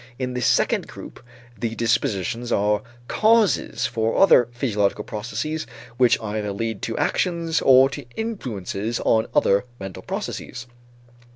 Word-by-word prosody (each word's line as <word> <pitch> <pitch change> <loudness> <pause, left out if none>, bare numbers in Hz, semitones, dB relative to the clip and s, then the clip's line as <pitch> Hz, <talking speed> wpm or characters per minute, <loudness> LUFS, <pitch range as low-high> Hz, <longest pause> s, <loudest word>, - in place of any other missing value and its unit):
In 125 -1 -3
this 125 -1 0
second - - +2
group, - - -11 0.3
the 115 +1 -3
dispositions 115 0 -1
are 105 +1 +2 0.3
causes 220 -1 +2
for 110 0 -1
other 125 -11 +6
physiological 105 -5 0
processes 140 +10 -4 0.3
which 125 -2 +4
either 105 -1 -3
lead 110 +1 -3
to 115 - -3
actions 170 -3 0
or 130 0 +7
to 120 - -7
influences 115 - -4
on 110 0 +2
other 100 +4 +3
mental 95 -2 -7
processes. 120 -1 -5
115 Hz, 125 wpm, -23 LUFS, 105-135 Hz, 0.3 s, or